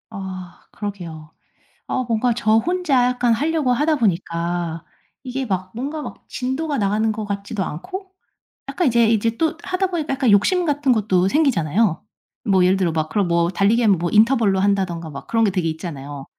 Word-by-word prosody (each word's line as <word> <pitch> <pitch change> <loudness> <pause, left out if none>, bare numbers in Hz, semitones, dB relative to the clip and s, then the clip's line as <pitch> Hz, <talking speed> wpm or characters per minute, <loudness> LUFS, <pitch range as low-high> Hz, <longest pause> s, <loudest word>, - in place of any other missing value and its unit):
아 185 -4 -8
그러게요. 170 -7 -7 0.6
아 255 - -1
뭔가 235 +1 +1
저 220 -2 +3
혼자 315 -3 +2
약간 245 -1 +2
하려고 300 +2 0
하다 300 +5 +2
보니까 170 - -1 0.4
이게 260 0 -3
막 185 -4 -3
뭔가 285 +6 -4
막 - - -9
진도가 275 +4 -2
나가는 215 +2 +1
것 215 0 -4
같지도 200 0 -3
않고 375 - -7 0.6
약간 355 - 0
이제 235 -2 +4
이제 225 +1 +1
또 320 0 0
하다 375 +1 0
보니까 325 -6 -2
약간 260 -4 +2
욕심 345 - +3
같은 290 -3 +1
것도 195 -5 +2
생기잖아요. 200 - +1 0.4
뭐 190 -4 +3
예를 185 +1 +3
들어 180 -3 +1
막 155 -1 -2
그런 200 +3 0
뭐 170 0 +2
달리기하면 205 +2 +3
뭐 175 +1 -1
인터벌로 220 -3 +4
한다든가 190 -4 0
막 140 -2 -9
그런 225 0 +1
게 200 - +2
되게 180 -3 -1
있잖아요. 145 -4 -6
215 Hz, 355 characters per minute, -21 LUFS, 180-260 Hz, 0.6 s, 이제